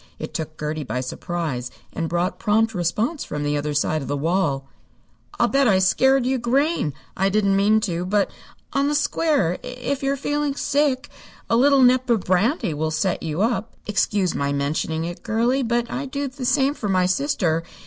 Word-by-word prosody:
It - - -7
took 155 -1 -5
Gertie 150 0 -3
by 125 -1 -3
surprise, 130 -1 -3 0.2
and 165 -1 -2
brought 175 +3 -1
prompt 220 +1 +2
response 210 - -1
from 150 0 -4
the 145 0 0
other 145 0 -2
side 155 +1 +1
of 135 - -6
the 145 +2 -1
wall. 145 -4 0 0.7
"I'll - - +4
bet 275 -1 +3
I 195 -4 +4
scared 265 +8 +3
you 260 0 +1
green. 250 - +1 0.2
I 195 +1 +2
didn't 200 -1 +2
mean 210 +2 +4
to, 175 -4 -2
but, 200 +2 +1 0.4
on 275 +1 +2
the 295 - +1
square, 290 - +1
if 250 +2 -4
you're 275 0 0
feeling 290 0 -1
sick, 285 -1 +1 0.4
a - - +5
little 275 +2 +5
nip 255 0 +4
of 230 -4 +3
brandy 185 - +1
will 155 +2 -1
set 175 +4 -1
you 160 +4 -1
up. 230 -1 -1
Excuse 200 -2 +1
my 140 0 -1
mentioning 155 +3 -1
it, 175 0 -6
girlie, 235 +4 +1
but 235 -1 -1
I'd 275 +2 -4
do 280 0 -2
the 260 -1 -6
same 275 +2 +3
for 215 -8 -4
my 185 -1 +3
sister. 180 - +1
205 Hz, 190 wpm, -22 LUFS, 165-260 Hz, 0.7 s, a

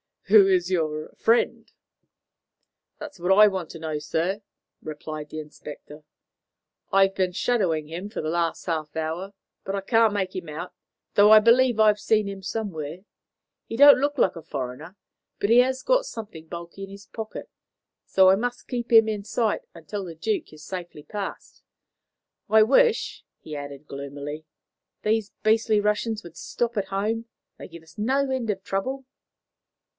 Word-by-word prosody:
"Who 200 -2 +8
is 185 -1 +2
your 155 -3 -2
friend?" 230 +1 +1 1.3
"That's 195 - -9
what 180 +2 +3
I 210 0 +9
want 190 -5 -3
to 165 - -9
know, 155 -2 -3
sir," 170 +7 -2 0.4
replied 155 0 -7
the 155 - -6
inspector. 150 0 -11 0.9
"I've 195 0 +4
been 185 -2 0
shadowing 175 -9 0
him 175 +5 -6
for 215 - -5
the 155 - -3
last 170 0 -1
half 155 -3 -3
hour, 165 +5 -3 0.3
but 195 - -2
I 200 - -2
can't 225 +2 +3
make 190 -2 -2
him 185 -3 -5
out, 155 +4 -6 0.4
though 205 +1 +6
I 215 - +10
believe 235 +1 +4
I've 210 -1 +5
seen 215 -1 +1
him 195 -1 -6
somewhere. 180 -7 -4 0.7
He - - -6
don't 285 +1 +8
look 290 +2 0
like 185 - +2
a - - -7
foreigner, 145 +5 -6 0.4
but 200 - 0
he 240 - +7
has 260 +1 +2
got - - +2
something 210 - -8
bulky 170 +3 -8
in - - -16
his 200 0 -12
pocket, 220 -1 -8 0.6
so 190 -1 +5
I 190 - +6
must 245 +3 -4
keep 240 -1 -4
him 225 -1 +7
in 210 -2 -3
sight 220 0 0
until 185 +5 -6
the 170 -2 -8
Duke 205 +1 -2
is 155 0 -13
safely 175 -5 -7
past. 205 +2 -7 0.9
I 220 0 +7
wish," 445 - +2 0.2
he 155 - -8
added 145 0 -8
gloomily, 145 +2 -7 0.6
"these 215 -1 0
beastly 220 -1 +3
Russians 210 +1 -1
would 170 -2 -12
stop 235 -1 -3
at 200 - 0
home. 215 +4 -2 0.3
They - - -8
give 170 -2 -12
us 160 - -20
no 265 +5 +1
end 255 -4 -2
of 195 -2 -2
trouble." 260 +8 -3
195 Hz, 165 wpm, -25 LUFS, 160-220 Hz, 1.3 s, I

